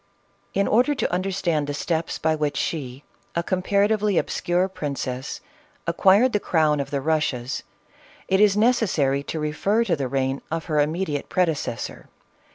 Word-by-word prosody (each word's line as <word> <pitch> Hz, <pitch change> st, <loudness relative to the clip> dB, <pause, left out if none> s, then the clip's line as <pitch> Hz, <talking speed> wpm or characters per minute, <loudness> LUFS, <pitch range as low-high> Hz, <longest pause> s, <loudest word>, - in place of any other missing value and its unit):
In 200 Hz, -, +2 dB
order 250 Hz, +7 st, +3 dB
to 235 Hz, -9 st, -1 dB
understand 180 Hz, -5 st, 0 dB
the 145 Hz, -, -3 dB
steps, 160 Hz, +2 st, -2 dB
by 160 Hz, 0 st, +1 dB
which 150 Hz, -2 st, -1 dB
she, 135 Hz, -4 st, -3 dB, 0.3 s
a 170 Hz, -, 0 dB
comparatively 200 Hz, +2 st, +1 dB
obscure 175 Hz, +2 st, +1 dB
princess, 140 Hz, -7 st, -4 dB, 0.4 s
acquired 195 Hz, +8 st, +4 dB
the 210 Hz, -, +2 dB
crown 155 Hz, -5 st, +2 dB
of 140 Hz, -, -3 dB
the 140 Hz, -, -1 dB
Eussias, 140 Hz, -5 st, -1 dB, 0.7 s
it 190 Hz, -, +2 dB
is 205 Hz, -1 st, +5 dB
necessary 205 Hz, -, +2 dB
to 155 Hz, +3 st, -5 dB
refer 175 Hz, +9 st, +1 dB
to 185 Hz, -7 st, +1 dB
the 140 Hz, -3 st, -2 dB
reign 135 Hz, +1 st, -1 dB
of 165 Hz, 0 st, -3 dB
her 150 Hz, -2 st, 0 dB
immediate 150 Hz, 0 st, -1 dB
predecessor. 160 Hz, -9 st, -2 dB
165 Hz, 150 wpm, -24 LUFS, 145-195 Hz, 0.7 s, is